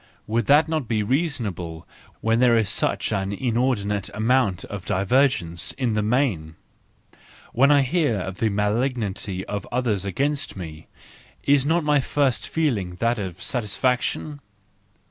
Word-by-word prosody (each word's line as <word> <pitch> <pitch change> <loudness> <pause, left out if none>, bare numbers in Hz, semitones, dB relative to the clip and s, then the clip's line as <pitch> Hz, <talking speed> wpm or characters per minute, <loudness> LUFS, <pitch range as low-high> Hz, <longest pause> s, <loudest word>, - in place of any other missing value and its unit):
Would 115 0 -1
that 150 +2 +5
not 155 -6 -2
be 110 -2 0
reasonable 105 - -2 0.4
when 115 +1 +2
there 120 -2 +5
is 110 -3 +1
such - - 0
an 95 0 -1
inordinate 110 -3 -1
amount 110 -4 +1
of 100 -3 -7
divergence 95 - +1
in 125 -4 -1
the 105 - +1
main? 105 - 0 1.0
When 135 +4 +5
I 145 -1 +5
hear 150 -3 +1
of 95 +1 -5
the 110 - +2
malignity 105 -2 -1
of 100 -2 -5
others 120 -6 0
against 140 - -2
me—is 95 - -3
not 165 +1 +2
my 150 -1 +3
first 135 -1 0
feeling 110 - -1
that 115 +4 0
of 95 -3 -6
satisfaction? 125 +5 -1
115 Hz, 135 wpm, -23 LUFS, 100-135 Hz, 1.0 s, that